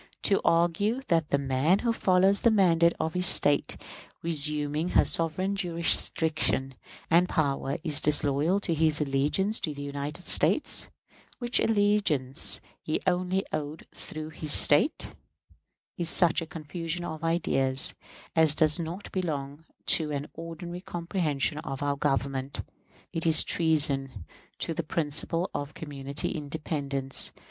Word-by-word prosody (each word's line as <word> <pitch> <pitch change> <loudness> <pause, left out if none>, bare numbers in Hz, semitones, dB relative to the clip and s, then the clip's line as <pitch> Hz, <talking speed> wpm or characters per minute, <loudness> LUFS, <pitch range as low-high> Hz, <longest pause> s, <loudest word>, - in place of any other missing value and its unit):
To 195 - +3
argue 175 +9 +1
that 165 -3 +1
the 140 - +2
man 140 +6 +1
who 230 +2 -1
follows 190 -1 +2
the 235 - +4
mandate 170 -5 +3
of 160 - -2
his 180 0 +3
State, 145 -4 +2 0.5
resuming 150 0 0
her - - +3
sovereign 185 +4 0
jurisdiction 160 -6 0 0.4
and 175 +2 +4
power, 140 -3 -1
is 155 -4 +2
disloyal 150 +4 +2
to 170 - -2
his 155 -1 +2
allegiance 150 +9 0
to 150 -3 -4
the 145 - -7
United 145 +4 -6
States, - - +3 0.5
which 240 -1 +1
allegiance 205 - +1 0.2
he 155 - -2
only 185 +1 0
owed 155 0 -5
through 155 0 -8
his 155 -1 -4
State, 150 - +4 0.9
is 170 -1 -1
such 175 -2 +4
a 165 - -7
confusion 165 +2 -5
of 160 -1 -7
ideas 135 -6 +1 0.4
as 160 -2 +5
does 155 +1 +3
not 170 +4 -6
belong 150 -4 -4 0.2
to 155 -2 +3
an 145 0 -4
ordinary 165 +2 -8
comprehension 170 -6 -3
of 135 -1 -6
our 145 0 0
Government. 135 -1 -2 0.5
It 165 0 -1
is 160 -1 +5
treason 140 - +2 0.3
to 165 - -3
the 170 - -3
principle 165 +2 +1
of 145 +1 -5
community 140 -2 -4
independence. 140 -3 -2
160 Hz, 135 wpm, -27 LUFS, 145-175 Hz, 0.9 s, as